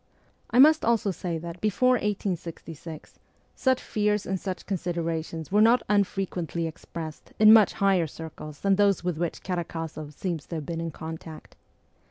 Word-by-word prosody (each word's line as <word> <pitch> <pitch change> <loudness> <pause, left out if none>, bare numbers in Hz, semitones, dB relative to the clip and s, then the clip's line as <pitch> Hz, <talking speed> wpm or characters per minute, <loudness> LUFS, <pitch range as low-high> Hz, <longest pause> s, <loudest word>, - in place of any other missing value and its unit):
I - - 0
must 310 +4 +7
also 230 -3 +2
say 175 -1 -3
that 170 +2 -8
before 215 +4 +2
1866 170 - -4 0.3
such 260 -1 +2
fears 210 -1 0
and 190 0 -2
such 185 -1 -5
considerations 165 -3 -3
were 205 +1 +4
not 230 +3 +5
unfre 200 -1 +1
quently 170 -1 -3
expressed 160 -1 -8
in 215 0 +8
much 220 -3 +6
higher 195 -5 +2
circles 155 -1 -9
than 195 -1 +3
those 200 -3 +3
with 175 -3 -2
which 170 -1 -3
Karakozoff 165 -4 -4
seems 170 -4 -4
to 170 - -5
have 155 -2 -4
been 165 +1 -4
in 165 - -3
contact. 160 0 -9
175 Hz, 160 wpm, -27 LUFS, 165-205 Hz, 0.3 s, in